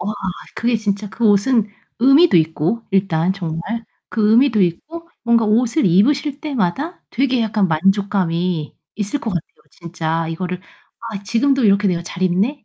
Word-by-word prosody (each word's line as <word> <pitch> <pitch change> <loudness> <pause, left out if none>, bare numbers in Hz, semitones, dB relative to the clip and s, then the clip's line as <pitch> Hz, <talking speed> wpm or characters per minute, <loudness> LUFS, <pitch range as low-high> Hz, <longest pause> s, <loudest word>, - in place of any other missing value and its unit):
우와 210 +3 -2 0.4
그게 235 0 0
진짜 210 -1 -3
그 230 +4 -1
옷은 210 +2 +3 0.3
의미도 275 - +5
있고 165 +7 0
일단 190 -3 +1
정말 165 -4 -4 0.5
그 215 -2 +1
의미도 235 -2 +4
있고 320 - -3
뭔가 230 -1 +3
옷을 230 +4 +2
입으실 280 - +2
때마다 285 - -2
되게 260 0 +1
약간 215 -3 +1
만족감이 180 -2 0 0.2
있을 210 +7 -2
것 225 - -3
같아요. 175 -4 -2 0.3
진짜 165 -1 -3
이거를 180 +2 -4 0.5
'아 200 -2 -6
지금도 265 +5 +1
이렇게 200 0 +3
내가 175 -2 -1
잘 180 +1 -7
입네.' 205 +10 0
205 Hz, 310 characters per minute, -19 LUFS, 180-240 Hz, 0.5 s, 의미도